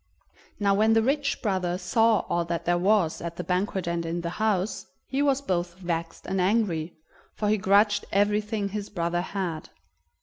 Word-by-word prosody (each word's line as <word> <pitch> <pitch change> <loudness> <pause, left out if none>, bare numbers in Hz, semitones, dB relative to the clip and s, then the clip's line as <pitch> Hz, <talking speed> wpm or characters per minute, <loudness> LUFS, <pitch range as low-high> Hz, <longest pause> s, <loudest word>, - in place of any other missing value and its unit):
Now 200 -1 +3
when 215 +3 +4
the 225 - +4
rich 280 +3 0
brother 185 -4 0
saw 225 +2 +3
all 175 - -1
that 170 0 -3
there 175 0 +2
was 190 -3 +2
at 170 0 -5
the 180 - -4
banquet 185 +1 -1
and 170 0 -1
in 170 +1 -3
the 170 0 -3
house, 210 -2 0 0.2
he 275 +1 -1
was 280 -1 +2
both 175 -5 -1
vexed 170 -2 -4
and 190 0 -1
angry, 180 -5 0 0.4
for 210 - -1
he 215 - +3
grudged 205 +2 +3
everything 210 +1 +1
his 205 0 -5
brother 175 -2 -1
had. 180 -4 -4
195 Hz, 175 wpm, -26 LUFS, 175-210 Hz, 0.4 s, when